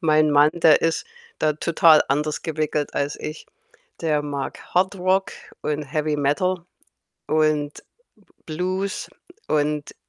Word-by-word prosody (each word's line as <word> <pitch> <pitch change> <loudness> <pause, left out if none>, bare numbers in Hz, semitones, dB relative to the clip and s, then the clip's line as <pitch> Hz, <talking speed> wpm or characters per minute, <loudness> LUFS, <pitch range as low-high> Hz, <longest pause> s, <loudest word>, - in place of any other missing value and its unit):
mein 155 -2 +3
Mann, 145 +1 +5
der 165 -2 +5
ist 165 0 0 0.4
da 155 -1 +2
total 160 0 +5
anders 150 +2 -1
gewickelt 155 -2 -2
als 140 +1 -1
ich. 155 - -7 0.5
Der 155 -3 +1
mag 140 -2 -4 0.2
Hardrock 190 +1 +2 0.3
und 150 0 -2
Heavy 150 +2 -1
Metal 170 +5 0 0.6
und 155 -1 +1 0.7
B 155 - -7
Blues. 185 +4 -2 0.4
Und, 150 -1 -1
155 Hz, 120 wpm, -23 LUFS, 150-170 Hz, 0.7 s, Mann